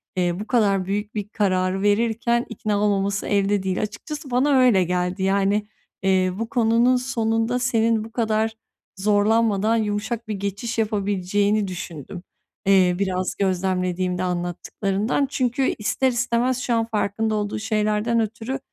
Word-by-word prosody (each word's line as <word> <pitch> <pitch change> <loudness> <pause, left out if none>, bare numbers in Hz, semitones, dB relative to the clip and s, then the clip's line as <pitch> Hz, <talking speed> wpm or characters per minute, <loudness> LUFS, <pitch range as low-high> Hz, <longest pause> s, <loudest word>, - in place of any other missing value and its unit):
eee, 175 -1 0
bu 210 - -6
kadar 200 -6 +2
büyük 205 +2 -3
bir 205 -1 -3
kararı 185 -2 0
verirken 230 +3 +1
ikna 210 -3 -2
olmaması 200 -1 0
elde 200 -1 +1
değil. 190 +1 -1
Açıkçası 265 +6 -6
bana 260 +4 +2
öyle 240 -7 +5
geldi, 180 +1 -1
yani, 200 +2 +1 0.4
eee, 185 -1 +2
bu 230 0 -3
konunun 235 +1 +3
sonunda 235 -1 0
senin 230 -3 +1
bu 225 - -10
kadar 220 -1 0 0.4
zorlanmadan 210 +1 +2
yumuşak 220 +2 -2
bir 215 - -2
geçiş 200 +4 -4
yapabileceğini 205 -1 0
düşündüm, 175 -1 -7 0.4
iii, 185 -2 +4
biraz 185 -1 -1
gözlemlediğimde 185 -1 0
anlattıklarından. 190 +7 -1
Çünkü, 255 +1 0
ister 215 +5 0
istemez 245 +1 0
şu 245 -1 -1
an 225 -1 +2
farkında 220 0 -1
olduğu 210 0 -2
şeylerden 215 +1 0
ötürü, 225 +4 -3
210 Hz, 135 wpm, -23 LUFS, 195-230 Hz, 0.4 s, öyle